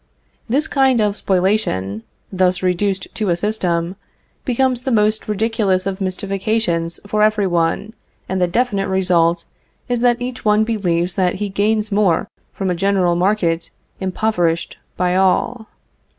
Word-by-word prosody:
This 280 +6 +1
kind 265 -3 +3
of 210 -2 +1
spoliation, 180 - 0 0.3
thus 185 -1 +1
reduced 185 +2 0
to 215 -3 -2
a 170 - +2
system, 180 -3 -1 0.5
becomes 255 -1 +1
then 255 -2 0
the - - +4
most 215 +1 +1
ridiculous 210 -3 0
of 195 0 -3
mystifications 190 -2 -1
for 210 +1 -1
every 215 -1 +3
one, 175 +4 0 0.3
and 190 0 -2
the 180 - +3
definite 200 0 0
result 175 -3 +2 0.4
is 245 -1 -1
that 245 0 +3
each 250 0 -5
one 210 0 +3
believes 180 -6 0
that 180 -1 +1
he 205 +1 -3
gains 210 +2 0
more 200 -5 +2 0.2
from 190 -2 -2
a - - 0
general 185 -1 +2
market 175 -3 +1 0.3
impoverished 180 -3 -1 0.2
by 180 0 +1
all. 190 +5 +1
195 Hz, 145 wpm, -19 LUFS, 180-215 Hz, 0.5 s, the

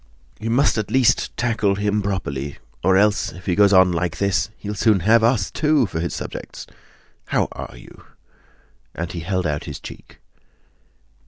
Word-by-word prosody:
"You 115 - -4
at 110 -7 +1
least 130 -2 +4
must - - -7
tackle 110 -4 +1
him 105 +1 0
properly, 70 -9 -3 0.3
or 95 +1 +4
else 105 +1 +2
if 90 - -12
he 90 - +1
goes 100 +2 +5
on 95 -2 +6
like 85 -1 -2
this 100 0 0
he'll 105 0 -5
soon 105 -2 +2
have 110 +5 +4
us, 115 -4 +2
too, 150 -4 +2
for 85 -5 -4
his 85 0 -3
subjects! - - -7 0.6
How - - +1
are - - -8
you?" - - -15 0.9
And 85 +1 -4
he 85 - -5
held 95 +2 -2
out 75 -2 -2
his - - -7
cheek. - - -12
100 Hz, 170 wpm, -21 LUFS, 85-110 Hz, 0.9 s, on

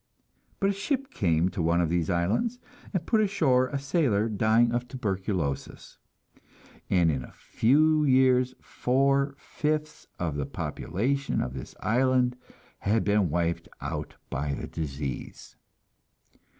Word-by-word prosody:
But 195 0 +2
a - - -2
ship 265 +7 -2
came 85 -1 +2
to 90 - -4
one 85 +1 +2
of 85 -2 +1
these 85 -2 0
islands, 105 - 0 0.3
and 185 -5 -2
put 220 -2 +3
ashore 155 -11 +3
a 140 - -3
sailor 135 - +1
dying 110 +3 +3
of 120 +1 -1
tuberculosis, 95 - -3 0.9
and 85 -3 +4
in 65 -4 -2
a - - -12
few 155 +5 +3
years 130 -1 +4
four 140 +2 +1
fifths 155 +1 -3
of 80 -4 -2
the 70 - -2
population 135 +8 -2
of 65 - -2
this 65 -2 -8
island 125 +1 +2 0.4
had 105 +3 +1
been 100 -3 +2
wiped 85 +1 -1
out - - -5 0.2
by 70 +1 -1
the - - -5
disease. 70 -4 -6
120 Hz, 135 wpm, -27 LUFS, 85-140 Hz, 0.9 s, and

